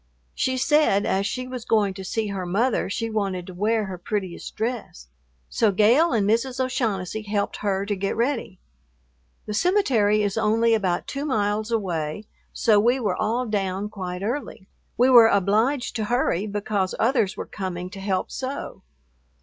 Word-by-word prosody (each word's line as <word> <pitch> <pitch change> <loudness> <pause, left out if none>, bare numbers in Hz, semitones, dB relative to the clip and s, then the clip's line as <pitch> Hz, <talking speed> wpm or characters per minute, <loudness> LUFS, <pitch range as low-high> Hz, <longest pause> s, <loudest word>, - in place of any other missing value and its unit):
She 260 0 0
said 265 -7 +3
as 195 +1 +1
she 255 +4 -3
was 255 -2 -6
going 210 -4 +2
to 190 - -8
see 215 +3 -2
her 195 -2 -3
mother 220 +4 +1
she 230 +3 -2
wanted 195 -4 -2
to 185 - -9
wear 215 +4 0
her 185 -2 -7
prettiest 190 -2 -4
dress, 220 - -4 0.4
so 220 - +2
Gale 230 - +4
and 215 -5 +1
Mrs. 240 +4 0
O'Shaughnessy 220 -6 -1
helped 205 -1 -2
her 195 -1 -1
to 205 0 -1
get 195 +1 -2
ready. 235 -6 -1 0.9
The 210 - -4
cemetery 225 - +2
is 205 +2 -1
only 225 +1 +3
about 190 -5 0
two 280 0 -4
miles 215 -4 0
away, 185 -4 -2 0.3
so 215 -3 +3
we 240 +5 +3
were 225 - 0
all 230 +4 -1
down 200 -2 -2
quite 185 -3 -5
early. 230 -4 -4 0.3
We 250 +2 +4
were 235 -3 +9
obliged 220 +7 +1
to 215 - -1
hurry 215 -4 0
because 205 -2 -2
others 230 -5 +1
were - - -4
coming 185 -2 -5
to 200 - -9
help 190 -1 -2
sew. 265 -6 -5
210 Hz, 165 wpm, -24 LUFS, 195-235 Hz, 0.9 s, were